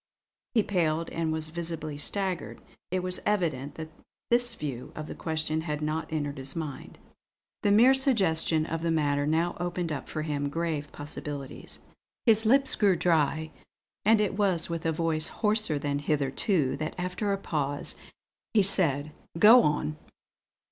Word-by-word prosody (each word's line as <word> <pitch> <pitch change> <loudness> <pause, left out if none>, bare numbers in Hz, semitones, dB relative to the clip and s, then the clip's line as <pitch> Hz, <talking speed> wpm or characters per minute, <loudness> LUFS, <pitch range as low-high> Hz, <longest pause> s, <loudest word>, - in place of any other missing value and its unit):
He 220 - +4
paled 165 -4 0
and 165 -1 -1
was 160 0 -3
visibly 165 -2 -4
staggered; 190 +2 -2 0.3
it 185 0 -1
was 185 0 -2
evident 155 -9 -1
that 160 -1 -7 0.4
this 240 0 +2
view 130 -5 -6
of 155 - -5
the - - -7
question 160 -1 -2
had 150 -2 -3
not 155 +2 -3
entered 145 -3 -3
his 135 +1 -6
mind. 150 -5 -6 0.6
The 205 - +2
mere 230 +6 +6
suggestion 190 - +2
of 165 0 -3
the 170 - -1
matter 145 -3 +1
now 165 +3 +1
opened 175 -1 -2
up 145 - -5
for 155 - -3
him 145 -2 -2
grave 155 -2 -3
possibilities. 145 -1 -7 0.4
His 220 -2 +6
lips 270 +3 +5
grew 200 -3 +3
dry, 160 -2 +1 0.5
and 220 +1 +5
it 210 -3 0
was 190 -5 +1
with 165 -1 -2
a - - +2
voice 160 -1 +2
hoarser 210 -7 0
than 145 0 -2
hitherto 145 - 0
that, 155 +1 -4
after 185 +3 -2
a 195 - +1
pause, 145 -6 -2 0.6
he 210 - +6
said: 155 -7 +3 0.3
"Go 225 +7 +8
on!" 150 -2 0
160 Hz, 155 wpm, -28 LUFS, 150-185 Hz, 0.6 s, Go